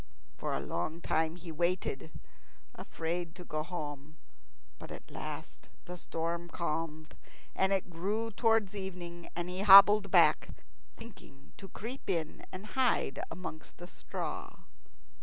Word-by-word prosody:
For - - -3
a - - 0
long 155 - -3
time 160 -1 0
he 175 -1 -8
waited, 170 -2 -1 0.6
afraid 165 +1 -4
to 180 - -9
go 155 -2 -2
home; 155 -3 -6 0.6
but - - -9
at - - -10
last - - -7 0.2
the 180 - -7
storm 170 0 -3
calmed, 160 -2 -4 0.4
and 190 0 +2
it 190 -2 0
grew 210 +7 -2
towards 225 -2 +2
evening, 175 -3 -6
and 175 0 -2
he 180 +1 -4
hobbled 200 +1 +9
back, - - +4 0.4
thinking 175 -12 -14
to 195 - -10
creep 235 +6 -6
in 165 -5 -2
and 185 +3 -7
hide 255 - +1
amongst 160 -3 -8
the 175 - -8
straw. - - -6
175 Hz, 135 wpm, -32 LUFS, 160-195 Hz, 0.6 s, hobbled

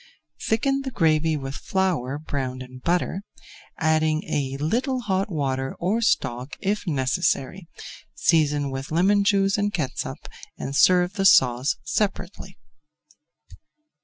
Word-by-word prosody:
Thicken 275 +5 +1
the 270 - -4
gravy 160 -7 +2
with 135 -1 -6
flour 155 -7 -1
browned 130 -4 -4
in 130 0 -12
butter, 175 +5 -1 0.6
adding 155 -1 +1
a 135 -2 -2
little 250 - -1
hot 195 -2 -1
water 135 -4 -2
or 200 +7 0
stock 130 - 0
if 205 +1 -2
necessary, 140 +4 -1 0.5
season 145 -4 +2
with 135 +1 -5
lemon 195 +5 +3
juice 200 0 +2
and 205 0 0
catsup 155 -9 -4 0.3
and 140 - -5
serve 180 +3 +4
the 195 -1 -1
sauce 130 -1 +4
separately. 200 +4 -3
160 Hz, 120 wpm, -24 LUFS, 135-195 Hz, 0.6 s, serve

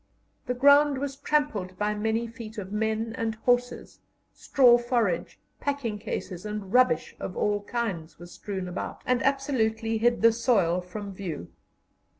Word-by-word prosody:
The 250 - -1
ground 285 +2 +5
was 275 0 -3
trampled 275 -12 -1
by 210 +1 0
many 220 +2 -1
feet 230 -1 -9
of 195 -2 -6
men 220 +1 -1
and 225 -1 -1
horses; 245 +2 -1 0.3
straw, 245 -3 +5
forage, 235 -8 -1 0.2
packing 270 -7 -2
cases, 185 -3 -5
and 210 -2 -5
rubbish 250 -1 +3
of 180 - -6
all 205 0 +1
kinds, 195 -10 -3
were 175 - -11
strewn 190 +1 -6
about, 180 +1 -6
and 250 0 +1
absolutely 230 -5 0
hid 235 0 +2
the 230 - +8
soil 205 -7 +2
from 200 +2 -7
view. 185 -6 -6
225 Hz, 150 wpm, -27 LUFS, 200-245 Hz, 0.3 s, the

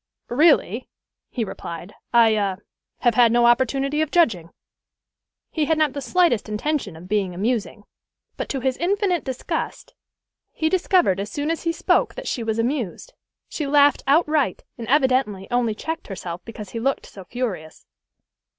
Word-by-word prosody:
"Really," 255 - +3 0.4
he 240 - -2
replied, 175 -2 -7 0.2
"I 230 -2 +5
ah 200 -3 0 0.5
have 240 - +3
had 235 -1 +5
no 240 0 +4
opportunity 270 +4 +2
of 315 - 0
judging." 225 - +2 1.0
He 310 -2 0
had 320 +1 +1
not 305 -3 +2
the 285 - -4
slightest 245 - +2
intention 215 - -2
of 170 +3 -11
being 195 -3 -1
amusing, 215 +1 -2 0.5
but - - -5
to 270 - -2
his 260 0 0
infinite 375 0 0
disgust 260 -2 -4 0.6
he 315 - 0
discovered 360 - +2
as 200 +1 -4
soon 290 +7 -2
as 330 - -4
he 335 - +2
spoke 330 - +1
that - - -7
she 245 - -2
was 225 -1 -2
amused. 235 - -2 0.3
She 300 - -4
laughed 285 0 +4
outright, 300 0 +2
and 230 -2 -7
evidently 255 -7 +2
only 240 -3 +1
checked 320 +8 -5
herself 180 -3 -6
because 210 -4 -9
he 230 - -4
looked 270 +4 -1
so 195 - -11
furious. 185 -8 -5
245 Hz, 160 wpm, -23 LUFS, 210-300 Hz, 1.0 s, I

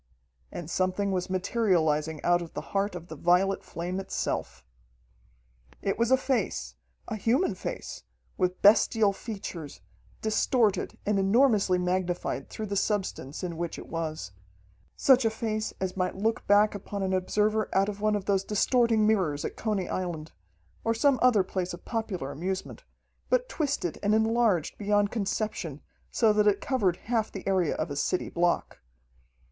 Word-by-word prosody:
And 170 - -6
something 185 +3 0
was 185 0 -2
materializing 170 -6 +1
out 175 0 +3
of 170 - -9
the - - -7
heart 200 -1 0
of 170 -1 -7
the 160 - -9
violet 180 +5 +2
flame 180 +3 -4
itself. 65 - -3 1.1
It - - -2
was 235 0 +2
a 260 - +6
face 195 - -1 0.3
a - - -3
human 230 - +1
face, 185 - -6 0.3
with 180 0 -1
bestial 210 0 +5
features, 195 -9 -7 0.4
distorted 220 0 +1
and 205 -1 +2
enormously 200 -2 +3
magnified 180 -6 -1
through 220 - -5
the 200 -1 -3
substance 190 -8 -2
in 170 -3 -4
which 170 -1 -3
it - - -10
was. 155 - -4 0.6
Such 265 -2 +5
a 225 - +3
face 215 -1 -2
as 190 -1 -2
might 185 -1 -1
look 220 +4 -1
back 205 +1 +5
upon 200 0 -5
an 190 0 0
observer 210 +3 +1
out 195 +1 +3
of 205 -1 -5
one 215 0 +2
of 200 -2 -3
those 195 -1 +1
distorting 225 +1 +2
mirrors 185 -10 +1
at - - -4
Coney 210 -5 -1
Island, 170 -4 -4 0.5
or 230 0 +1
some 270 +3 +3
other 245 -6 +5
place 185 -1 -3
of 175 - -18
popular 200 - -3
amusement, 190 - -4 0.4
but - - +2
twisted 280 - -2
and 210 +1 +2
enlarged 220 -6 +1
beyond 205 0 +2
conception, 200 - -2 0.3
so 225 -3 +3
that 210 0 +3
it 200 -1 +3
covered 200 -10 0
half 225 -2 0
the 195 - -7
area 185 -5 +2
of 155 -1 -3
a - - -3
city 180 +5 -1
block. 175 0 0
195 Hz, 160 wpm, -28 LUFS, 175-220 Hz, 1.1 s, a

